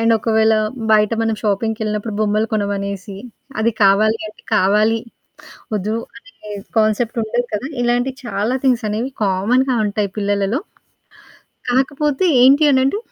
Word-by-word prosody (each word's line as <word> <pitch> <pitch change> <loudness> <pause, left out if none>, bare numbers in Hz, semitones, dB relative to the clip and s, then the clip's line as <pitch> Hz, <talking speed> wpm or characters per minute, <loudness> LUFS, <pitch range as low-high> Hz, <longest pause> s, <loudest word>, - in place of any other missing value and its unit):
And 230 0 +3
ఒకవేళ, 220 0 +2 0.4
బయట 210 0 +4
మనం 225 -1 0
షాపింగ్‌కెళ్ళినప్పుడు 215 0 -2
బొమ్మలు 215 +1 +1
కొనమనేసి, 200 -2 -3 0.4
అది 225 +2 +2
కావాలి 215 +3 +4
అంటే, 215 - -12
కావాలి 210 +4 +3 0.8
వద్దు 210 +2 -2 0.2
అనే 225 -1 -16 0.4
కాన్సెప్ట్ 220 +2 +1
ఉండదు 240 +3 -1
కదా! 230 +6 -3
ఇలాంటి 245 +2 +1
చాలా 210 +2 -1
థింగ్స్ 245 -4 +2
అనేవి 225 +6 -2
కామన్‌గా 240 +7 +1
ఉంటాయి 205 -1 -2
పిల్లలలో. 205 +5 0 1.1
కాకపోతే 285 +5 0 0.2
ఏంటి 275 +4 +6
అనంటే, 265 +9 +2
220 Hz, 120 wpm, -18 LUFS, 205-240 Hz, 1.1 s, ఏంటి